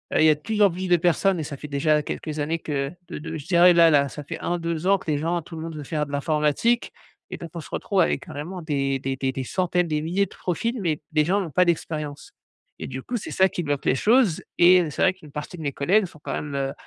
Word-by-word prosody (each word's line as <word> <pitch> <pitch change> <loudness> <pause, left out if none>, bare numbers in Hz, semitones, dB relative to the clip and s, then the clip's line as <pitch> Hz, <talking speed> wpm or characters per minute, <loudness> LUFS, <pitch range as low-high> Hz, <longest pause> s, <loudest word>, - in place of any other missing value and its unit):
Il - - +5
y 160 - +7
a 155 - +5
de - - -18
plus 215 +4 -2
en 200 - +7
plus 185 +1 -4
de 175 - +5
personnes 175 +2 +2
et 155 - -2
ça 145 -2 -6
fait 150 - -8
déjà 150 +1 +1
quelques 155 +1 -5
années 160 +3 -1
que 140 -3 -2 0.2
de - - -6
de 160 +2 -6
je 145 - -10
dirais 175 -1 +6
là 170 -1 +6
là, 140 -2 +3
ça 145 +3 -8
fait - - -6
1-2 170 -1 -2
ans 195 0 +4
que 165 - -8
les 150 - +1
gens 170 +3 -1
tout 165 +1 -11
le 160 - -6
monde 165 -1 -6
veut 150 - -6
faire 150 +1 -2
de 145 - -11
l'informatique 150 - +1 0.4
et - - -4
donc 170 - -8
on 165 - -4
se - - -12
retrouve 195 -2 0
avec - - +1
carrément 170 +5 -6
des 135 -3 -1
des 135 0 -3
des 130 0 -1
des 130 0 -4
centaines, 180 +3 0
des 150 -1 -1
milliers 180 +5 +1
de - - -16
profils 230 +7 -2
mais 160 -6 -1
les 155 -1 +3
gens 195 +5 +2
n'ont 175 - -4
pas 180 +5 +3
d'expérience 155 -4 -3 0.5
et - - -5
du 130 0 -6
coup, 240 - -3
c'est - - -7
ça 190 0 +4
qui 175 - -3
bloque 145 -3 -2
les - - +4
choses 215 - +3 0.2
et 180 +1 +7
heu, 165 - -2
c'est - - -4
vrai 185 - +4
qu'une 155 -6 -16
partie 150 +5 -6
de 160 - -8
mes 140 - -1
collègues 190 +8 +2
sont 160 - -17
quand - - -5
même, 150 -1 -4
heu 135 0 -1
160 Hz, 285 wpm, -24 LUFS, 145-180 Hz, 0.5 s, y